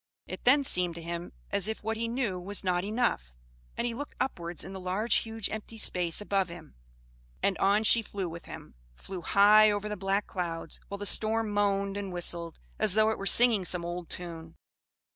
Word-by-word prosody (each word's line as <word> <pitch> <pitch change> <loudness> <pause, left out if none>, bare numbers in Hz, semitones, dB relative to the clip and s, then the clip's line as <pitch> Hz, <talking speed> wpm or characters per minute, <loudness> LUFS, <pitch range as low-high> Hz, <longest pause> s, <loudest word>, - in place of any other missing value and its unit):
It - - -8
then 280 +3 +5
seemed 180 -8 +2
to 170 - -7
him 170 +1 -5 0.2
as 200 -1 +2
if 220 -1 -4
what 220 +1 -1
he 230 +1 -2
knew 230 -6 -2
was 200 +3 0
not 180 -1 0
enough, 195 - -1 0.4
and - - -1
he 240 - -1
looked 290 +5 -7
upwards 170 -9 -3
in 190 - -8
the 190 - -6
large 190 +5 +1
huge 225 -2 -3
empty 220 +1 -6
space 175 -5 +2
above 195 -3 0
him, 170 -2 -11 0.7
and 195 - +2
on 200 +2 +3
she 230 +1 +5
flew 200 -3 -5
with 170 0 -8
him; - - -10 0.2
flew 185 - -8
high 210 +4 +6
over 205 0 -1
the 210 - -3
black 195 +1 -1
clouds, 165 -3 -3
while 200 - -6
the 205 - -5
storm 220 +1 +1
moaned 200 -1 0
and 200 -2 -4
whistled 170 -1 -3 0.2
as 185 - +3
though 215 0 +4
it - - -4
were 195 - -2
singing 230 -4 +5
some 175 -1 -1
old 175 0 -5
tune. 165 -2 -7
195 Hz, 200 wpm, -29 LUFS, 175-215 Hz, 0.7 s, high